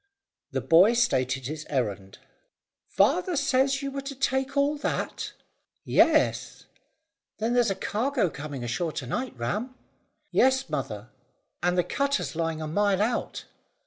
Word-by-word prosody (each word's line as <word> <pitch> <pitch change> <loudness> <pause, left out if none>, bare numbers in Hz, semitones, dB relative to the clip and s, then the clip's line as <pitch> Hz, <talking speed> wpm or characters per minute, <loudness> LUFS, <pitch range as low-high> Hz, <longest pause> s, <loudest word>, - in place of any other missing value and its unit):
The - - -2
boy 180 +8 +6
stated 130 - +1
his 155 +3 -5
errand. 100 -8 -2 0.7
"Father 365 -3 +2
says 275 0 +2
you 275 - -3
were 275 0 -4
to 275 0 -7
take 265 +1 -1
all 285 +2 +3
that?" 290 - -3 0.5
"Yes." - - +2 0.7
"Then 225 +2 -1
there's 245 -3 +3
a 195 - 0
cargo 235 +4 0
coming 145 -3 -6
ashore 155 +7 -2
to 135 - -4
night, 250 - -4
Ram." 210 - -3 0.6
"Yes, 260 -8 +3
mother, 120 -6 -4 0.5
and 180 +1 +1
the 180 - +4
cutter's 280 - -1
lying 165 -1 -2
a - - -4
mile 200 +4 +1
out." 235 +3 -1
200 Hz, 140 wpm, -27 LUFS, -, 0.7 s, boy